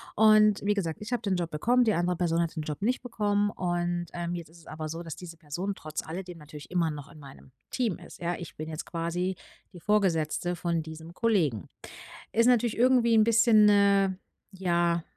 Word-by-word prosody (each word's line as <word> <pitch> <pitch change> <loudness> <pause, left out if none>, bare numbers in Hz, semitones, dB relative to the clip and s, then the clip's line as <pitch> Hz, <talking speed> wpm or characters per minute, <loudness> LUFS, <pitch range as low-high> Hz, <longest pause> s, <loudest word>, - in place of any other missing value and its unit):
Und 215 -1 +5
wie 210 - +3
gesagt, 170 -6 -3
ich 210 - -8
habe 245 - 0
den 200 -5 0
Job 175 -2 -3
bekommen, 240 +12 +2
die 220 -3 +2
andere 175 0 0
Person 170 -1 +1
hat 165 0 -2
den 155 - -3
Job 150 +2 -5
nicht 250 +5 0
bekommen 205 -4 0
und, 175 -1 -2
ähm, 175 0 -3
jetzt 170 -3 -7
ist 165 - -18
es 165 - -19
aber 155 0 -6
so 165 +2 -5
das 165 -3 -7
diese 170 -2 -10
Person 170 +6 -4
trotz 155 -2 -5
alledem 180 +1 -7
natürlich 150 0 -12
immer 175 -2 +1
noch 145 -2 -9
in 155 - -14
meinem 135 -2 -14 0.2
Team 235 -8 -1
ist. - - -13
Ja, 175 +1 -1
ich 170 - -9
bin 155 - -5
jetzt 155 0 -5
quasi 175 +2 -2 0.4
die 175 - -10
Vorgesetzte 175 -3 +1
von 170 -1 -1
diesem 160 +1 -10
Kollegen. 165 - +1 0.6
Ist 230 +1 +3
natürlich 240 -2 +3
irgendwie 245 -1 +4
'n 220 - +6
bisschen, 225 -1 +5
äh, 200 -1 +4 0.4
ja 175 -3 0
175 Hz, 205 wpm, -28 LUFS, 165-210 Hz, 0.6 s, n